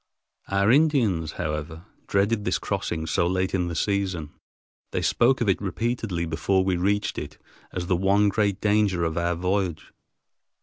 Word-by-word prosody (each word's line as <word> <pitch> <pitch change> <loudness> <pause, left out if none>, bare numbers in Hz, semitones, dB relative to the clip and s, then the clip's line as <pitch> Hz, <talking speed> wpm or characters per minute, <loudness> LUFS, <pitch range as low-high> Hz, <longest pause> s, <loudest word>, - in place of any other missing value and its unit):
Our 100 +2 +2
Indians, 120 - +2
however, 80 +1 -4 0.2
dreaded 100 +2 +1
this - - +1
crossing 80 -1 -3
so 85 +1 +1
late 95 +1 0
in 90 -2 0
the 85 - -4
season. 95 -4 -1 0.6
They - - -2
spoke 125 +2 +3
of 120 - +1
it 95 - +2
repeatedly 105 -3 -2
before 85 +4 +1
we 95 -1 +1
reached 100 +4 0
it - - -8 0.3
as 90 - -4
the 90 - +1
one 100 +3 +3
great 100 -1 +1
danger 105 -4 +2
of 80 -1 -1
our 85 0 0
voyage. 90 -2 -2
95 Hz, 160 wpm, -25 LUFS, 85-105 Hz, 0.6 s, spoke